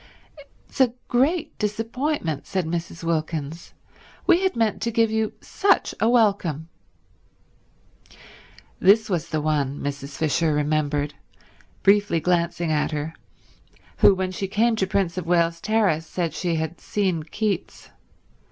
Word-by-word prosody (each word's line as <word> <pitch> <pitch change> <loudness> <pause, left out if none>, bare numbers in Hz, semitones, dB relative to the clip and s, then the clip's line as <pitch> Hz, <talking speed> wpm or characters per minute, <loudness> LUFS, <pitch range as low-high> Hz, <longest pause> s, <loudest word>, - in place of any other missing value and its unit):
"It's - - -3
a 245 -2 +3
great 295 +7 +1
disappointment," 225 - -2
said 185 -3 -1
Mrs. 165 0 -4
Wilkins. 160 -1 -3 0.5
"We 355 -1 +5
had 380 -6 +1
meant 225 -2 0
to 235 - 0
give 230 -1 +2
you 220 -1 0
such 395 0 +1
a 225 - +3
welcome." 195 - +2 2.1
This 210 +3 +4
was 170 -4 -1
the 155 -1 -1
one, 145 -2 0
Mrs. 140 -1 -5
Fisher 155 0 +1
remembered, 150 -1 0 0.7
briefly 200 -4 +4
glancing 170 -1 0
at 150 -1 +1
her, 155 +1 -4 0.8
who 195 - +6
when 185 0 -2
she 195 +1 -3
came 225 +4 +2
to 190 - +1
Prince 185 -2 0
of 170 - -7
Wales 170 -1 +2
Terrace 200 -8 +1
said 170 -3 -2
she 170 +1 -1
had 160 +1 -3
seen 190 -6 -1
Keats. 195 +4 -3
175 Hz, 135 wpm, -24 LUFS, 155-215 Hz, 2.1 s, who